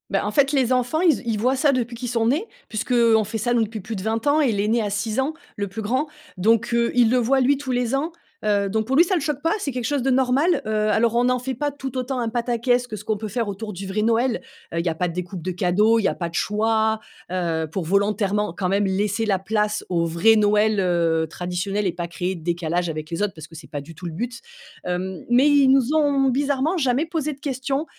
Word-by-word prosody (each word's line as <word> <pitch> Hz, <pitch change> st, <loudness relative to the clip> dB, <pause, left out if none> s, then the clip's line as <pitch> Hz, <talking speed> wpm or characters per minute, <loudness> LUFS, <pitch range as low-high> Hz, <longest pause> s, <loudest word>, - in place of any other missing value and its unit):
Bah 195 Hz, -, 0 dB
en 210 Hz, -, -1 dB
fait, 275 Hz, +4 st, +3 dB
les 260 Hz, -3 st, +2 dB
enfants, 250 Hz, +5 st, 0 dB
ils 345 Hz, -3 st, +5 dB
z -, -, -5 dB
ils 225 Hz, -2 st, 0 dB
voient 255 Hz, +5 st, +2 dB
ça 285 Hz, +2 st, +3 dB
depuis 245 Hz, -3 st, -2 dB
qu'ils 245 Hz, +1 st, -5 dB
sont 230 Hz, -1 st, +1 dB
nés 300 Hz, -, +1 dB, 0.2 s
puisque, 215 Hz, +3 st, -4 dB
heu, 235 Hz, -2 st, +5 dB
on 220 Hz, -, +3 dB
fait 220 Hz, +2 st, -4 dB
ça 240 Hz, +3 st, 0 dB
nous 235 Hz, -2 st, +3 dB
depuis 220 Hz, 0 st, -5 dB
plus 220 Hz, +3 st, -6 dB
de 190 Hz, -, -5 dB
20 220 Hz, +1 st, -1 dB
ans 295 Hz, +2 st, +4 dB
et 270 Hz, -5 st, +3 dB
l'aîné 215 Hz, +3 st, +1 dB
a 210 Hz, -, -2 dB
6 210 Hz, +3 st, -2 dB
ans, 275 Hz, +4 st, 0 dB, 0.2 s
le 200 Hz, 0 st, -3 dB
plus 200 Hz, +4 st, -6 dB
grand 255 Hz, +8 st, 0 dB, 0.3 s
donc, 225 Hz, +5 st, +2 dB
heu, 235 Hz, 0 st, +2 dB
il 240 Hz, -2 st, +5 dB
le 255 Hz, -, +3 dB
voit, 255 Hz, +3 st, +2 dB
lui, 270 Hz, +2 st, +3 dB
tous 270 Hz, -2 st, -5 dB
les 245 Hz, 0 st, 0 dB
ans, 305 Hz, +5 st, -1 dB, 0.3 s
heu, 205 Hz, -1 st, +2 dB
donc, 220 Hz, +2 st, -1 dB
pour 265 Hz, -, 0 dB
lui, 330 Hz, -, +7 dB
ça 370 Hz, +2 st, 0 dB
le 340 Hz, -, 0 dB
choque 290 Hz, -1 st, -2 dB
pas. 330 Hz, -, +1 dB
C'est 290 Hz, -, -3 dB
quelque 250 Hz, -2 st, -4 dB
chose 285 Hz, +2 st, 0 dB
de 265 Hz, -, 0 dB
normal. 265 Hz, +6 st, +2 dB
Heu, -, -, -4 dB, 0.2 s
alors, 225 Hz, +2 st, +2 dB
on 240 Hz, +1 st, +3 dB
n'en 250 Hz, 0 st, +2 dB
fait 260 Hz, +2 st, -3 dB
pas 290 Hz, +4 st, -2 dB
tout 270 Hz, -2 st, -6 dB
autant 255 Hz, +1 st, -2 dB
un 235 Hz, -2 st, -1 dB
pataquès 245 Hz, +1 st, 0 dB
que 220 Hz, -, -6 dB
ce -, -, -9 dB
qu'on 215 Hz, -, -1 dB
peut 215 Hz, -, -5 dB
faire 230 Hz, +1 st, -2 dB
autour 205 Hz, +2 st, -5 dB
du 190 Hz, +2 st, -7 dB
vrai 195 Hz, +3 st, -1 dB
Noël. 230 Hz, +2 st, +1 dB, 0.3 s
Heu, 170 Hz, -, -1 dB
il 170 Hz, -, -2 dB
y -, -, +2 dB
a 160 Hz, -, -3 dB
pas 180 Hz, +2 st, 0 dB
de 170 Hz, -, -5 dB
découpes 180 Hz, +1 st, -5 dB
de 185 Hz, -, -3 dB
cadeaux, 195 Hz, +6 st, +3 dB
il -, -, -1 dB
y -, -, +3 dB
a -, -, -1 dB
pas 170 Hz, -2 st, -3 dB
de -, -, -17 dB
choix, 220 Hz, +2 st, +1 dB, 0.3 s
heu, 165 Hz, -3 st, -1 dB
pour 185 Hz, +1 st, -2 dB
volontairement 200 Hz, +1 st, +1 dB
quand 180 Hz, +1 st, -2 dB
même 200 Hz, +2 st, +2 dB
laisser 205 Hz, +3 st, 0 dB
la 195 Hz, -3 st, +1 dB
place 210 Hz, +2 st, -1 dB
au 170 Hz, -2 st, +1 dB
vrai 170 Hz, +7 st, +4 dB
Noël, 210 Hz, 0 st, +3 dB
heu, 170 Hz, -3 st, +1 dB
traditionnel 180 Hz, +4 st, -3 dB
et 175 Hz, -, -1 dB
pas 175 Hz, -1 st, -4 dB
créer 180 Hz, +2 st, -3 dB
de 165 Hz, -, -11 dB
décalage 175 Hz, 0 st, -1 dB
avec 155 Hz, -1 st, -5 dB
les 165 Hz, +3 st, -3 dB
autres 210 Hz, -1 st, 0 dB
parce 155 Hz, -1 st, -10 dB
que 165 Hz, -, -15 dB
c'est 160 Hz, -1 st, -11 dB
pas 145 Hz, -3 st, -5 dB
du 155 Hz, +4 st, -12 dB
tout 180 Hz, -, -10 dB
le -, -, -5 dB
but. 235 Hz, +6 st, -4 dB, 0.5 s
Hem, 180 Hz, 0 st, -3 dB
mais 250 Hz, +4 st, +5 dB
ils 285 Hz, -2 st, +5 dB
nous 270 Hz, +1 st, +3 dB
ont 285 Hz, -3 st, +3 dB
bizarrement 285 Hz, +5 st, 0 dB
jamais 265 Hz, 0 st, +1 dB
posé 315 Hz, -2 st, -2 dB
de 275 Hz, -, -17 dB
questions. 270 Hz, +1 st, -2 dB
225 Hz, 275 wpm, -23 LUFS, 195-255 Hz, 0.5 s, lui